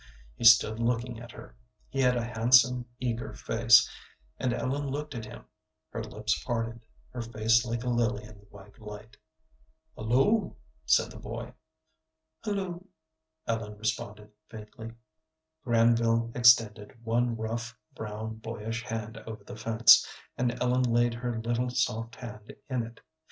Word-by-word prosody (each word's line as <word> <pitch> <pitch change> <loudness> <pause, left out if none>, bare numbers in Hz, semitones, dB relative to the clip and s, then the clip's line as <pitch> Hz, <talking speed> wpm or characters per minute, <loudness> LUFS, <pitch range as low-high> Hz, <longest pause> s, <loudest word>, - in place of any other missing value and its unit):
He - - -4
stood 115 -1 +7
looking 120 0 -1
at 120 0 -10
her. - - -13 0.3
He 135 - -5
had 125 -1 +3
a 120 - -1
handsome, 125 +1 +4
eager 120 +1 -3
face, 115 0 +5 0.5
and 125 - 0
Ellen 140 +4 -2
looked 145 +2 -4
at 115 -3 -6
him, - - -11 0.5
her - - -4
lips - - -2
parted, 115 -1 -3 0.3
her 125 -1 -5
face 115 0 +2
like 115 +1 -3
a - - -5
lily 120 -2 0
in 105 -1 -13
the 100 - -20
white 100 0 -16
light. 105 +1 -10 0.8
"Hulloo," 135 - +1 0.3
said - - +3
the - - -10
boy. - - -7 0.9
"Hulloo," 190 -4 -3 0.6
Ellen 110 -2 -3
responded, 105 -1 -4 0.2
faintly. 110 +1 -10 0.7
Granville 115 -1 +2
extended 115 -3 +4
one 120 +1 +1
rough, 115 +1 -4 0.2
brown, 110 +1 -6
boyish 115 +1 -5
hand 110 -1 -5
over 110 -2 -8
the 105 - -9
fence, 115 +1 +6 0.3
and 125 0 -1
Ellen 125 +1 +2
laid 120 -1 +2
her 120 0 -3
little, 120 +2 -1
soft 115 -2 -1
hand 110 -3 -10 0.2
in 125 -2 +1
it. 115 - -15
115 Hz, 140 wpm, -29 LUFS, 110-125 Hz, 0.9 s, stood